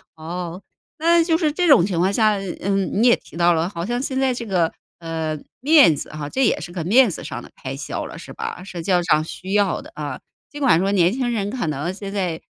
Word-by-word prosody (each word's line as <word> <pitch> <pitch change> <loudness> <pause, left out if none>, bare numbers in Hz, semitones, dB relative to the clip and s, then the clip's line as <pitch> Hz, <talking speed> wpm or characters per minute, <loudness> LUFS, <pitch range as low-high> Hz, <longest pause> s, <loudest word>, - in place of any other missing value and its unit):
哦， 170 +3 -6 0.4
那 335 +1 +4
就 325 -1 +2
是 315 -4 +1
这 350 +4 0
种 275 - +7
情 185 -4 -2
况 190 +3 +2
下， 215 -1 +3 0.2
嗯， 195 +1 0
你 245 - +5
也 240 - +6
提 - - -17
到 175 0 +4
了， 165 +1 0
好 170 -3 -5
像 240 +2 -1
现 265 -1 -3
在 265 -1 +2
这 235 -1 -5
个， 180 -5 +1 0.3
呃， 160 -2 -3 0.2
面 285 - +6
子 - - -6
哈， 150 -1 -6
这 265 - +1
也 - - +2
是 175 - -7
个 175 -3 -4
面 240 +4 +5
子 - - -6
上 - - -6
的 - - -13
开 - - -5
销 - - -5
了， - - -9
是 - - -10
吧？ 180 - -6
社 180 -3 -7
交 180 -1 +2
上 155 -2 +3
需 185 +3 -8
要 205 -3 +2
的 - - -13
啊。 145 -3 -5 0.3
尽 295 0 -8
管 245 -12 +4
说 195 +2 +1
年 180 -2 +4
轻 255 -1 -1
人， 205 -2 -1
可 240 -5 -3
能 150 +3 -2
现 200 0 -7
在 180 -5 -2
195 Hz, 265 characters per minute, -21 LUFS, 170-245 Hz, 0.4 s, 种